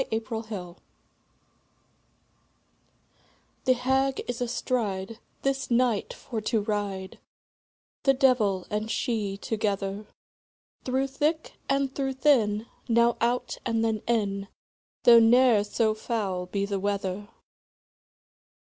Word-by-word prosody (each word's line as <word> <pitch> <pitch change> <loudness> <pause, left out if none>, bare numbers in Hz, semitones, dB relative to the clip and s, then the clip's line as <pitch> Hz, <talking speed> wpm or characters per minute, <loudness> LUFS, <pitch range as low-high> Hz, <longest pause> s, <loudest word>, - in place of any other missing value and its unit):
THE 220 - 0 0.3
HAG 180 -5 -7 2.8
The 260 - +5
Hag 265 +2 +1
is 245 0 -4
astride, 230 -4 -2 0.2
This 270 -1 -1
night 240 -3 +2
for 230 -5 -6
to 220 +1 +1
ride, 205 -3 -3 0.8
The 270 -1 +3
devil 220 -9 +3
and 210 +1 -2
she 210 -4 -1
together; 205 -1 -2 0.8
Through 260 +1 +1
thick 300 +4 -1 0.2
and 275 -1 +1
through 270 -1 -1
thin, 230 -6 +3 0.2
Now 235 0 +4
out, 240 +2 0
and 225 0 0
then 220 -2 0
in, 200 -4 0 0.6
Though 235 -1 +9
ne'er 230 -1 +5
so 215 +1 +1
foul 200 -5 -3
be 200 +2 -1
the 200 -1 -2
weather. 200 0 -2
225 Hz, 105 wpm, -27 LUFS, 205-255 Hz, 2.8 s, Though